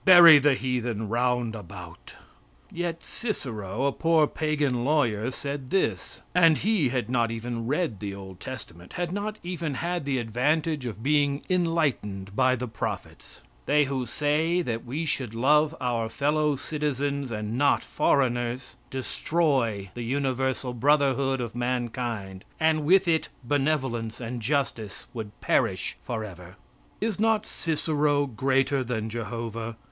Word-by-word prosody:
Buy 170 -4 +10
the 145 -1 +4
heathen 120 -4 -2
round 120 0 +1
about." 105 -6 -10 0.6
Yet 170 -1 -3
Cicero, 120 - -4
a 140 - +3
poor 165 +1 +3
pagan 145 -5 0
lawyer, 125 -6 +1
said 140 0 -5
this 195 - -1
and 165 -4 +6
he 200 - +2
had 125 -3 -1
not 120 -2 +1
even 115 0 -4
read 145 - 0
the 100 -2 -4
old 95 -2 -10
testament 85 +1 -9
had 175 -1 -2
not 205 +2 -3
even 170 -5 -3
had 175 +2 -2
the 140 -2 0
advantage 135 +5 0
of 110 -1 -6
being 145 -1 +2
enlightened 145 - 0
by 130 +2 +4
the 125 0 -4
prophets: 110 - -6 0.3
"They 150 +1 +4
who 135 -3 -2
say 155 +7 +1
that 115 -4 -3
we 145 +7 -3
should 130 -6 -2
love 150 +6 +3
our 120 -3 -1
fellow 150 +3 +1
citizens, 140 -1 -2
and 105 0 -3
not 140 +3 +3
foreigners, 120 -2 0
destroy 130 - 0
the 120 - -6
universal 130 0 -1
brotherhood 135 0 +2
of 120 -2 -4
mankind, 120 -5 -3 0.2
and 160 -1 +2
with 190 +3 +5
it 160 -1 +1
benevolence 130 -4 0
and 120 0 -5
justice 115 -5 -2
would 110 -4 -7
perish - - +1
forever." 95 -6 -6 0.4
Is 215 -2 -1
not 220 0 +2
Cicero 150 -3 0
greater 135 +2 +1
than 115 -3 -2
Jehovah? 115 0 -5
130 Hz, 135 wpm, -27 LUFS, 115-150 Hz, 0.6 s, Buy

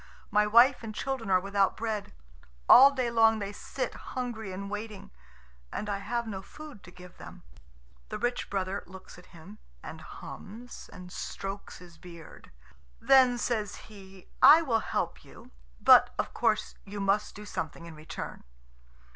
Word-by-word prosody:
My 210 0 +3
wife 240 +5 +5
and 220 -2 -7
children 265 -5 -3
are 185 -1 +4
without 195 +1 0
bread. 220 -2 -3 0.6
All 270 +3 +10
day 255 -4 -2
long 225 -1 +4
they 200 -1 -4
sit - - -5
hungry 235 -5 -6
and 195 +2 -6
waiting, 210 -1 -7 0.6
and 210 - -4
I 200 - -2
have 235 +4 -3
no 200 -4 -5
food 295 +1 -12
to - - -12
give 180 0 -15
them." - - -12 0.7
The - - -4
rich 245 0 -2
brother 195 0 -2
looks 185 0 -13
at 180 - -17
him, 160 -11 -14 0.2
and - - -9
hums 240 +4 -10
and 180 0 -11
strokes 195 +2 -6
his 175 -2 -15
beard. 170 -2 -13 0.5
Then 255 -2 +5
says 225 -4 -2
he: 195 -3 -14
"I 325 +2 +9
will 235 -7 +1
help - - -3
you. - - -16 0.3
But, - - +7
of - - -3
course, - - 0
you 205 +1 -8
must 195 +1 0
do 210 0 -9
something 170 -4 -5
in 170 - -10
return. 155 +1 -8
205 Hz, 160 wpm, -29 LUFS, 190-235 Hz, 0.7 s, All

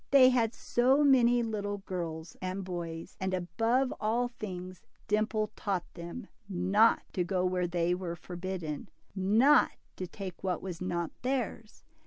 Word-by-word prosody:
They 265 -2 +8
had 235 -3 +1 0.2
many 250 -2 +5
little 205 -2 -2
boys 170 -4 -5
and 185 +1 -3
girls, 170 -2 -5
and 190 0 -1
above 230 +8 +1
all 235 +3 +1
things 185 -6 -7 0.3
Dimple 215 0 +1
taught 190 -4 -1
them, 170 +7 -7 0.2
— - - -29 0.2
Not 220 +2 +6
to 180 - +1
go 180 +1 0
where 180 -1 +1
they 175 0 +1
were 180 -2 -3
forbidden. 175 -3 -5 0.3
Not 220 +10 +5 0.2
to 185 - -4
take 185 -1 -8
what 185 -2 0
was 180 -3 -5
not 175 -2 -2
theirs. 245 -4 -3
190 Hz, 145 wpm, -31 LUFS, 180-230 Hz, 0.3 s, They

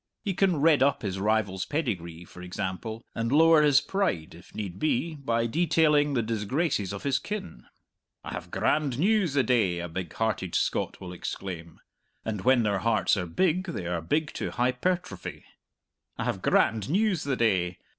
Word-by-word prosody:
He 195 - 0
can 180 -3 +2
redd 155 0 +4
up 140 -1 +2
his 95 -2 -3
rival's 100 -2 0
pedigree, 90 - -3
for 90 - -13
example, 95 +5 -5
and 115 +1 -2
lower 160 +1 +6
his 145 -2 +5
pride 190 - -1
(if 85 +2 -16
need 95 -4 -5
be) 155 +2 0
by 115 -6 -1
detailing 150 0 +3
the 120 - +1
disgraces 110 - -1
of 100 - -6
his 135 -2 +1
kin. 140 - -6 0.6
"I - - -7
have - - -6
grand 145 -5 0
news 190 -2 +2
the 135 - +4
day!" 110 -9 +2
a 85 0 -4
big 85 -1 -5
hearted 110 -6 -1
Scot - - 0
will 90 -1 -8
exclaim 85 -2 -6 0.5
(and 105 -3 -3
when 125 +1 +4
their 100 -2 +1
hearts 110 0 +2
are 90 -3 -3
big 185 - +1
they 165 - -5
are 85 -1 -2
big 150 - -1
to - - -3
hypertrophy) 130 +9 -2 0.7
"I - - -2
have - - -2
grand 110 +1 +2
news 195 0 +1
the 140 -2 0
day! 95 -7 +1
115 Hz, 175 wpm, -27 LUFS, 95-155 Hz, 0.7 s, lower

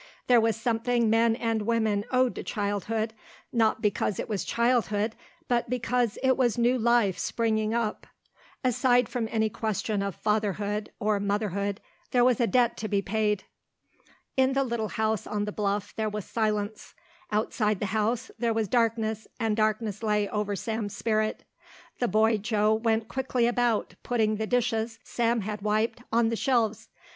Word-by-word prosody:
There 245 -2 +5
was 225 0 +2
something 235 -1 +1
men 225 0 +4
and 225 -2 -1
women 215 -2 +1
owed 255 -1 +2
to - - -5
childhood, 215 +1 -2 0.4
not 225 -2 +2
because 210 -2 0
it - - -3
was 210 -4 -2
childhood 230 -3 +1 0.3
but 240 -2 0
because 245 -2 0
it 260 0 +4
was 245 -4 +1
new 240 +2 +3
life 235 -5 +3
springing 220 -1 0
up. 230 -3 -2 0.6
Aside 250 -1 +3
from 240 -3 -2
any 220 -1 +1
question 215 -1 -2
of 200 -2 -3
fatherhood 210 0 -1
or 210 -2 +1
motherhood 200 0 -1 0.3
there 245 -1 +4
was 250 -3 +3
a 235 - +3
debt 245 -1 +2
to 215 - -3
be 200 -2 0
paid. 210 -1 0 0.9
In 265 0 +3
the 275 0 +2
little 235 -4 -2
house 220 -1 -1
on 205 -1 -1
the 210 - -3
bluff 205 -1 -2
there 220 -1 -1
was 210 -2 -5
silence. 215 -1 -2 0.4
Outside 210 -1 0
the - - -1
house 225 +3 0
there 230 -2 +1
was 220 -2 0
darkness 225 -1 0
and 225 -3 +1
darkness 215 -1 0
lay 210 -2 +1
over 210 -1 -1
Sam's 220 0 -3
spirit. 215 -1 0 0.6
The 245 - +1
boy 220 0 +3
Joe 215 0 +1
went 225 0 +1
quickly 260 -2 0
about, 240 -2 +1
putting 220 -3 +1
the 220 0 -2
dishes 230 -2 0
Sam 235 -1 0
had 210 +1 -4
wiped 215 +3 0
on 230 0 +3
the 230 - -1
shelves. 230 -4 0
220 Hz, 165 wpm, -27 LUFS, 210-235 Hz, 0.9 s, There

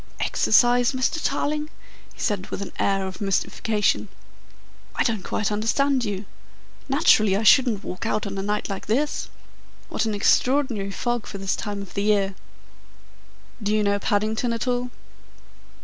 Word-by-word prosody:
"Exercise, 245 +3 +3
Mr. 260 +5 -1
Tarling?" 300 +2 -1 0.4
he - - -21
said 200 -3 -1
with - - -4
an - - -8
air 195 -1 +1
of 190 +1 -7
mystification. 210 +2 0 0.9
"I - - +2
don't 220 -5 0
quite 210 +2 -2
understand 255 +5 +1
you. 205 -1 -4 0.6
Naturally 215 - +4
I 215 - -1
shouldn't 220 -2 +5
walk 185 +5 -5
out 215 - -1
on 200 -1 -5
a 195 - -2
night 210 +1 -2
like 195 -2 -6
this. 285 +7 0 0.6
What - - -1
an 215 -2 -1
extraordinary 245 -1 +2
fog 240 +3 -2
for 200 - -6
this 195 -1 -1
time 205 -2 -4
of 195 - -13
the 200 - -1
year!" 200 -2 +2 1.3
"Do 205 0 -1
you 215 - +2
know 200 0 +1
Paddington 215 +4 0
at 230 +2 -3
all?" 245 0 0
215 Hz, 155 wpm, -24 LUFS, 200-245 Hz, 1.3 s, shouldn't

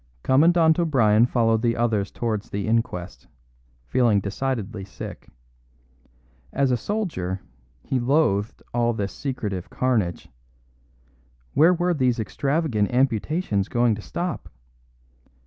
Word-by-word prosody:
Commandant 160 +4 +4
O'Brien 120 -9 +4
followed 115 -3 +2
the 115 -1 +1
others 110 -4 0
towards 110 -4 -3
the 100 0 -3
inquest, 110 -6 -2 0.6
feeling 110 - +3
decidedly 110 0 -3
sick. 95 - -9 1.2
As 140 -1 +1
a - - +3
soldier, 120 - -3 0.4
he 130 - -1
loathed 120 -6 +1
all 120 0 +1
this 100 -3 -3
secretive 105 -10 -4
carnage; 110 -9 -1 1.3
where 170 +4 +5
were 175 +1 +1
these 130 -5 +1
extravagant 135 -2 0
amputations 125 - 0
going 120 -1 +2
to 105 - -5
stop? 175 - -4
120 Hz, 110 wpm, -24 LUFS, 105-140 Hz, 1.3 s, where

